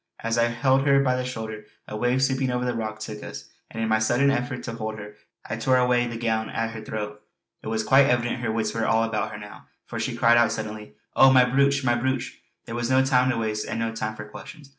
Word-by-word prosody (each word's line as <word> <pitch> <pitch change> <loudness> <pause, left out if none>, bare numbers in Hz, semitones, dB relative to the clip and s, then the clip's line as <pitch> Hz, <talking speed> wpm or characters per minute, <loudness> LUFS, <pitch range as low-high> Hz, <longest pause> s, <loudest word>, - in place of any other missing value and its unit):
As 115 0 0
I 115 - +4
held 130 +3 +1
her 140 0 +5
by 130 -1 +2
the 125 - -2
shoulder, 110 -4 -6 0.2
a - - -6
wave 125 +4 +1
sweeping 130 -1 +1
over 125 0 -1
the 125 - 0
rock 110 -2 -4
took 110 -1 -7
us, - - -9 0.2
and 115 - -4
in - - 0
my 110 0 +2
sudden 120 +5 +3
effort 125 -1 -2
to 115 - -5
hold 110 -1 -5
her 105 0 -9 0.3
I - - -4
tore 130 -1 +2
away 125 -1 +2
the 120 -1 -5
gown 110 -1 -1
at 115 0 -2
her 110 -1 -7
throat. 105 -1 -6 0.4
It - - -9
was 110 0 -1
quite 135 +4 +5
evident 120 -1 0
her 115 -2 -1
wits 110 -1 -1
were 115 -1 -1
all 115 0 +3
about 115 -1 -1
her - - -7
now 105 -1 -12 0.2
for - - -6
she - - -2
cried 120 0 +5
out 120 -2 +4
suddenly: 110 -7 -6 0.2
"Oh, 135 - +7
my 130 -1 +6
brooch! 140 +2 +2
my 120 -2 +3
brooch!" 130 +1 -2 0.2
There 115 - -7
was 120 0 -2
no 130 0 +4
time 130 -1 +3
to 125 - 0
waste 110 -2 -2
and - - -3
no 115 0 -2
time 110 -1 -4
for 105 - -8
questions. 140 +6 -12
120 Hz, 255 wpm, -25 LUFS, 110-130 Hz, 0.4 s, Oh